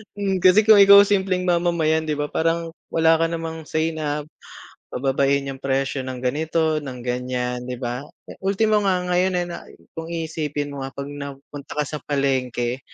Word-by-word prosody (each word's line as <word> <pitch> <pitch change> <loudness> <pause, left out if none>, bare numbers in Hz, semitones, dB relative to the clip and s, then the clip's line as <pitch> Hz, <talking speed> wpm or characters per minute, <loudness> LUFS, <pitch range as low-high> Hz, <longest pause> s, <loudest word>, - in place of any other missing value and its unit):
Hmm, 195 -2 -1
kasi 185 +4 +6
kung 215 -1 +7
ikaw, 200 0 +9
simpleng 190 -2 0
mamamayan, 170 -3 +1
'di 150 - 0
ba, 145 0 -3
parang 165 0 0 0.2
wala 160 0 +3
ka 165 - +2
namang 165 -1 -5
say 160 +1 0
na 150 -2 -3 0.6
pababain 135 +1 +1
yung 135 -1 -6
presyo 135 +1 -1
ng 130 -1 -6
ganito, 155 +4 0
ng 130 -4 -7
ganyan, 125 0 -3
di 125 - -4
ba? 120 0 -4 0.3
Eh, - - -13
ultimo 210 +2 +2
nga 190 -3 +1
ngayon 180 +1 +2
eh, - - -5
na 170 - -8 0.3
kung 165 -1 -7
iisipin 155 -3 -3
mo, 135 -1 -5
ah, 135 - -11
pag 140 +1 -6
napunta 140 0 -9
ka 150 - +1
sa 150 +1 -6
palengke, 130 -3 -1
155 Hz, 175 wpm, -22 LUFS, 135-170 Hz, 0.6 s, ikaw